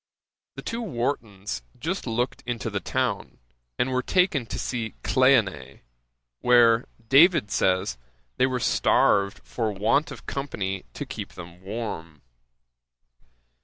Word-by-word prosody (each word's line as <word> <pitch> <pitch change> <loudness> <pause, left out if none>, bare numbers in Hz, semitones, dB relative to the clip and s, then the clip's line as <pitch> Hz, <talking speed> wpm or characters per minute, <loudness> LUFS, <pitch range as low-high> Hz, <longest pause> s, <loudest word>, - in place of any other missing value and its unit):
'The - - -8
two 230 +1 -3
Wartons 115 - -3 0.2
just 165 +5 -3
looked 120 +4 -1
into 120 -2 -3
the - - -1
town, - - -2 0.4
and 130 - +1
were 130 0 +1
taken 170 -5 +1
to - - -5
see 115 -3 -3
Cleone, 110 - +2 0.6
where, 120 -1 +5 0.2
David 140 - +5
says, 95 -8 +1 0.4
they 130 - +4
were 130 -1 -1
starved 100 -3 +2
for 110 -3 -2
want 105 +9 +1
of - - -10
company 95 -9 -3
to - - -4
keep - - -7
them 90 0 -11
warm. 95 -7 -6
115 Hz, 125 wpm, -25 LUFS, 95-130 Hz, 0.6 s, where